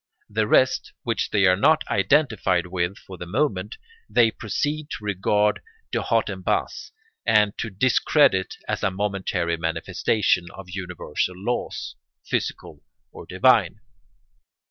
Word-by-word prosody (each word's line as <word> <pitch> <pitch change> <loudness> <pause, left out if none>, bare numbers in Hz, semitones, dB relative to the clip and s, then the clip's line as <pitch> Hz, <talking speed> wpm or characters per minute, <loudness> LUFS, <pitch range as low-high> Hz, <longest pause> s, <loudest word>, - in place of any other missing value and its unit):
The 110 0 0
rest, 130 +4 +2
which - - -1
they 100 -2 +3
are 90 -1 +5
not 155 +11 +3
identified 100 - +2
with 90 +1 -2
for 95 -2 -12
the 85 - -7
moment, 105 - -1 0.3
they 115 -2 +4
proceed 145 +9 -3
to 110 - -6
regard 105 +1 +1 0.3
de - - 0
haut - - +1
en - - -5
bas - - -2 0.3
and 105 -2 +3
to 115 - -2
discredit 105 -1 +2
as - - -2
a 105 - +2
momentary 95 -4 -2
manifestation 85 +3 0
of 95 -2 -10
universal 90 -1 -3
laws, 120 +6 -3 0.3
physical - - -3 0.3
or - - -11
divine. 100 -1 +3
100 Hz, 130 wpm, -24 LUFS, 90-110 Hz, 0.3 s, are